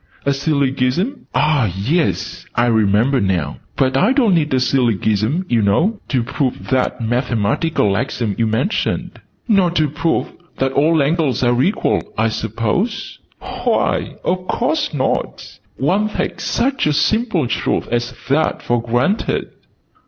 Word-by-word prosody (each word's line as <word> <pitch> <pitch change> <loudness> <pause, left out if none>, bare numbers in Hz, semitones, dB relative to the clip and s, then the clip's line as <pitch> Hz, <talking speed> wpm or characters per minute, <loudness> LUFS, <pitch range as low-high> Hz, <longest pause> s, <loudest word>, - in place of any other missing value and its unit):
"A 140 - +3
Sillygism? 140 - 0
"Ah, 145 - +2
yes! 100 - -1
I 120 - +3
remember 115 +3 +2
now. 90 -7 -1 0.2
But 130 -1 +2
I 200 - +3
don't 245 -8 +3
need 155 -3 +1
a 130 - +2
Sillygism, 120 - +1
you 120 -6 +2
know, 165 - +2
to 130 -4 0
prove 130 +2 -3
that 130 -1 +1
mathematical 120 - 0
axiom 115 -1 -2
you 115 - 0
mentioned." 125 - -1 0.3
"Nor 195 -6 +4
to 155 -3 +1
prove 155 +3 -1 0.2
that 135 0 0
'all 150 +2 +3
angles 140 -4 0
are 120 0 +3
equal', 200 +9 +1 0.2
I 110 +1 +2
suppose?" 115 - -2 0.4
"Why, - - 0
of 185 0 -1
course 295 +5 0
not! 135 -4 -3 0.2
One 195 +10 +1
takes - - -3
such 270 - 0
a 150 - +2
simple 220 - +1
truth 120 - -1
as 120 +1 -1 0.2
that 145 +4 +1
for 120 -1 0
granted!" 120 - 0
135 Hz, 140 wpm, -18 LUFS, 115-170 Hz, 0.4 s, Nor